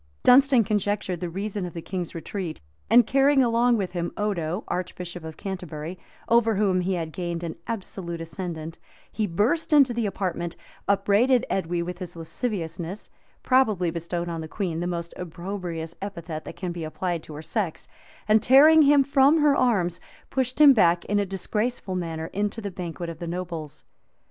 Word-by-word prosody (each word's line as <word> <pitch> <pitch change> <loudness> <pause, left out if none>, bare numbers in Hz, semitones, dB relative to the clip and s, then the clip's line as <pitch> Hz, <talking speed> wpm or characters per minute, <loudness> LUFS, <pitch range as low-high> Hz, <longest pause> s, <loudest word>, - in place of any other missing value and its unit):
Dunstan 260 -1 +6
conjectured 205 -3 -1
the 175 - -3
reason 200 +3 -3
of 175 -2 -5
the 165 - -6
king's 180 -3 -5
retreat; 170 0 -5 0.3
and, 240 0 +7
carrying 275 +2 +4
along 235 0 +3
with 190 -4 -2
him 175 -1 -3
Odo, 190 -3 -1
archbishop 180 -1 -5
of 160 -1 -8
Canterbury, 180 -3 -6 0.3
over 230 -1 +4
whom 190 -3 +2
he 185 +1 0
had 165 -2 -3
gained 175 -1 -4
an 165 -2 -4
absolute 190 -6 -4
ascendant, 165 -1 -6 0.3
he 215 -2 -1
burst 210 - +1
into 280 -5 +6
the 230 -2 0
apartment, 175 -3 -3 0.3
upbraided 205 +6 +3
Edwy 175 -2 -1
with 180 +1 -6
his 175 -2 -7
lasciviousness, 170 +1 -4 0.3
probably 215 -10 +3
bestowed 170 +1 -3
on 165 -1 -4
the 160 - -6
queen 170 -2 -3
the 175 - -2
most 170 -1 -4
opprobrious 175 -2 -5
epithet 170 -5 -6
that - - -8
can 180 -2 -4
be 170 -1 -5
applied 170 +2 -3
to 155 - -11
her 155 - -8
sex, 185 -2 -3 0.4
and 215 0 +5
tearing 305 +5 +7
him 285 -1 +6
from 280 +2 +4
her 295 -2 +4
arms, 190 -10 +1 0.3
pushed 260 0 -1
him 290 -2 +9
back, 175 -7 +3
in 205 0 +1
a 200 - 0
disgraceful 210 +2 -2
manner, 165 -3 -3
into 205 +3 -1
the 205 -3 -5
banquet 175 -1 -5
of 165 -1 -7
the 170 - -5
nobles. 170 -3 -5
185 Hz, 175 wpm, -25 LUFS, 170-220 Hz, 0.4 s, him